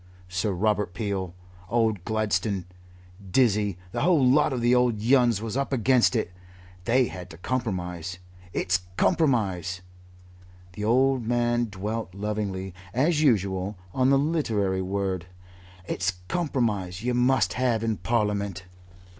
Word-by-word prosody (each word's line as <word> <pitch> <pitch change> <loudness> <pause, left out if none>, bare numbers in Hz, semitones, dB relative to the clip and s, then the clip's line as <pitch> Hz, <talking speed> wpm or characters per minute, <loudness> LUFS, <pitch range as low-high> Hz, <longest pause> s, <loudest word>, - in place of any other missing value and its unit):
Sir 90 +4 -1
Robert 105 0 0
Peel, 95 -5 -3 0.3
old 110 -5 +1
Gladstone, 105 -3 0 0.6
Dizzy, 105 -4 +2
the - - -2
whole 165 -7 +4
lot 150 +4 +4
of 130 - -1
the 120 +1 +3
old 125 -3 +3
Yuns 120 -2 +3
was 115 0 -4
up 140 +1 -1
against 130 0 +3
it. 110 -6 -1 0.5
They 125 +2 +4
had 90 -5 -8
to 80 - -11
compromise. 90 -6 -3 0.3
It's 90 0 +1 0.2
compromise" 100 - +1 0.9
the 105 - -6
old 130 +1 +2
man 120 0 +1
dwelt 105 -1 -5
lovingly, 100 -2 -3 0.2
as 150 +4 +2
usual, 100 -7 +1 0.2
on 130 0 +3
the 140 - +5
literary 115 - 0
word 95 -2 -2 0.6
"it's 90 -1 -1
compromise 110 - -1
you 125 +1 0
must 125 -6 +2
have 120 -2 +1
in 110 -2 0
Parliament." 100 -1 -1
110 Hz, 130 wpm, -26 LUFS, 95-125 Hz, 0.9 s, the